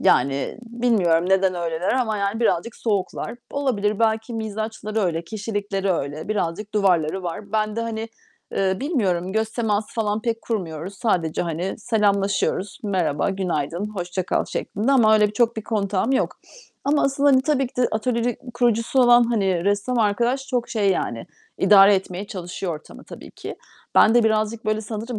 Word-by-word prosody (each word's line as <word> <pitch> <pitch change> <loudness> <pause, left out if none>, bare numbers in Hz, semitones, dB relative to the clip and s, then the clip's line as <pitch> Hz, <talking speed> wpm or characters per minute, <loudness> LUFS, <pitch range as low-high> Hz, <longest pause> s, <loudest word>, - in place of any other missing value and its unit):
Yani 140 +8 +2
bilmiyorum 220 -8 +1
neden 190 -1 +3
öyleler 170 +1 -1
ama 240 -4 0
yani 200 +3 -1
birazcık 225 0 0
soğuklar. 205 +1 -2
Olabilir, 215 -8 0
belki 225 +1 0
mizaçları 220 0 -3
öyle, 170 -4 -1
kişilikleri 205 -2 -2
öyle. 155 +2 -4
Birazcık 210 +1 -2
duvarları 185 -3 +2
var. 200 +4 -6
Ben 215 0 0
de, - - 0
hani, 225 0 -4 0.4
eee, 190 -1 +1
bilmiyorum, 190 - 0
göz 220 +1 0
teması 215 -3 -1
falan 215 -1 -1
pek 230 -1 -2
kurmuyoruz. 180 -4 -4
Sadece, 180 -7 0
hani, 170 +3 -3
selamlaşıyoruz, 200 -2 0
"Merhaba, 185 -6 0
günaydın, 180 -1 -2
hoşça 180 0 -3
kal." - - 0
şeklinde. 225 +7 -2
Ama 220 -5 +5
öyle 210 -1 +5
bir - - -8
çok 230 +1 +2
bir 220 - -3
kontağım 210 +2 0
yok. - - 0 0.5
Ama 290 +1 +2
asıl, 275 +1 0
hani 270 -2 +5
tabii 270 -3 +1
ki - - -16
de 250 -1 +2
atölyenin 235 +1 0 0.2
kurucusu 240 +1 +1
olan, 240 -1 +6
hani, 195 -7 0
ressam 205 +5 0
arkadaş 235 +5 +1
çok 245 -3 -1
şey 205 -4 +1
yani, 120 -10 -2 0.3
idare 195 +1 +7
etmeye 190 +1 -3
çalışıyor 180 -2 -5
ortamı 150 - -12
tabii - - -11
ki. - - -8 0.4
Ben 220 - +6
de 240 -1 +5
birazcık, 220 +1 0
böyle, 215 0 0
sanırım 220 +2 -5
210 Hz, 160 wpm, -23 LUFS, 190-230 Hz, 0.5 s, idare